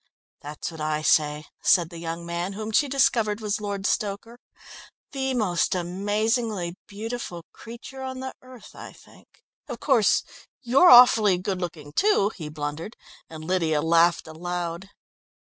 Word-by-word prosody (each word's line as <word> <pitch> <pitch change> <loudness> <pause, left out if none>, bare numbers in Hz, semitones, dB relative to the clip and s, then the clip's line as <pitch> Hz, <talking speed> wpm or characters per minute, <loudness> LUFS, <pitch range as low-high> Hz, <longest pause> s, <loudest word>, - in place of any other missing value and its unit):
"That's 150 +3 -6
what 160 -1 -9
I 155 0 -1
say," 150 0 +2 0.2
said 170 -2 +3
the 170 - -9
young 165 0 -5
man, 170 +3 -3
whom 215 +2 -5
she 285 +7 +3
discovered 230 -6 +1
was 210 -1 -2
Lord 200 -1 -4
Stoker. 215 +4 -2 0.7
"The 265 -1 -2
most 190 -7 0
amazingly 205 +1 -1
beautiful 205 -5 -6
creature 240 +3 -10
on 260 0 -5
the 260 0 -6
earth, 255 -2 -14
I - - -10
think." - - -21 0.2
"Of - - -7
course - - +3 0.4
you're 265 +9 +5
awfully 225 -6 +7
good 185 +1 -3
looking, 155 -4 -7
too," 395 - +2
he 155 -4 -7
blundered, 150 +6 -6 0.3
and 155 -1 -9
Lydia 160 -4 0
laughed 170 +1 +3
aloud. 175 +2 -5
190 Hz, 145 wpm, -25 LUFS, 165-225 Hz, 0.7 s, awfully